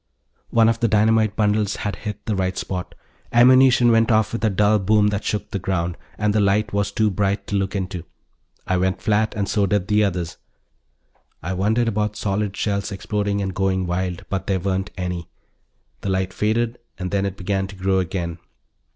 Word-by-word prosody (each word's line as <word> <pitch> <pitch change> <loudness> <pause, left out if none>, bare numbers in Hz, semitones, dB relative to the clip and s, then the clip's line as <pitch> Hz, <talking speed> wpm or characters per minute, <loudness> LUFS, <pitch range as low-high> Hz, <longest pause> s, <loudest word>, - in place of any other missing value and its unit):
One 115 -1 +4
of 115 0 +1
the 115 - +2
dynamite 110 0 +3
bundles 105 -1 +1
had 105 - -3
hit 105 -2 -6
the 110 - -1
right 95 -1 -1
spot. 90 -2 -4 0.4
Ammunition 125 0 +6
went 115 0 +3
off 110 0 +2
with 115 - -3
a 110 - +4
dull 105 +2 +3
boom 105 +2 +3
that 100 0 -2
shook 105 - -3
the 100 - -2
ground, 85 -2 -1 0.2
and 105 -1 +1
the 110 - +2
light 100 +1 +2
was 100 0 0
too 110 -1 +1
bright 100 +1 0
to 100 - -3
look 95 0 -1
into. 95 -2 -3 0.6
I 95 - +1
went 95 +1 0
flat 110 +1 +1
and 100 -2 -1
so 100 -1 +1
did 100 +1 0
the 105 0 +4
others; 90 -4 -2 1.1
I 95 - -2
wondered 110 +6 +1
about 105 -1 -1
solid 105 0 -2
shells 100 -1 -1
exploding 100 0 -2
and 95 -1 -3
going 95 -1 0
wild, 90 0 -3
but 95 -1 -3
there 95 -1 +1
weren't 95 +1 -1
any. 90 -2 -4 0.7
The 100 - -4
light 95 0 -1
faded, 115 +3 0 0.2
and 90 -1 -4
then 100 -1 +1
it 100 -1 -3
began 95 0 -1
to 100 - -11
grow 95 0 +1
again. 90 -2 -3
100 Hz, 195 wpm, -22 LUFS, 95-105 Hz, 1.1 s, Ammunition